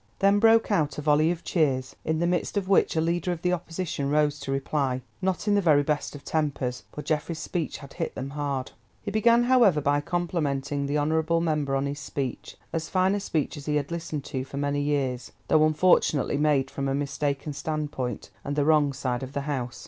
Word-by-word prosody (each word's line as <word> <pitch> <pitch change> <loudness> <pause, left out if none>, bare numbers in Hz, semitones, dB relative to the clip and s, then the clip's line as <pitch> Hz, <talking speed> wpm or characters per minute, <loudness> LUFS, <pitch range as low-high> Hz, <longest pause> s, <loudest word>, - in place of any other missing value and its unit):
Then 200 +1 +4
broke 225 0 +5
out 155 -7 +1
a - - -3
volley 155 +1 +4
of 175 -1 -3
cheers, 135 -6 0
in 160 0 0
the 170 - +1
midst 180 +3 0
of 195 -2 -1
which 195 -3 +3
a - - +2
leader 170 +2 0
of 175 -2 -5
the 180 0 +2
Opposition 170 -4 -3
rose 150 0 +2
to 140 -1 -5
reply, 135 -2 -1 0.2
not 190 +2 -1
in 205 - +4
the 205 - +3
very 150 -5 +4
best 150 0 -2
of 145 - -11
tempers, 135 -7 -2
for 150 - -7
Geoffrey's 155 +1 -1
speech 170 -1 -3
had 140 -1 -12
hit - - -4
them 135 +1 -5
hard. 140 -3 -3 0.3
He 205 - -3
began, 235 +3 +4
however, 240 -10 +5
by 145 0 +1
complimenting 145 -5 -1
the 145 +1 0
honourable 160 +2 +1
member 150 -4 0
on 135 +1 0
his 140 +1 -3
speech, 135 -5 -5 0.2
"as 160 -1 -2
fine 185 +1 +2
a 205 - 0
speech 160 -5 -2
as 145 - -9
he 150 - +1
had 145 +1 -1
listened 160 -4 -4
to 130 -3 -4
for 135 +1 -8
many 145 0 0
years, 135 -4 -1 0.2
though, 155 0 +5
unfortunately, 155 -3 +3
made 145 -3 +2
from 140 0 -3
a 135 - 0
mistaken 145 +1 -2
standpoint 145 -6 -4
and 140 - -3
the 145 -1 +1
wrong 150 -2 +4
side 125 -2 -2
of 130 +1 -7
the 140 - -1
House." 135 -4 -3
150 Hz, 215 wpm, -26 LUFS, 140-170 Hz, 0.3 s, broke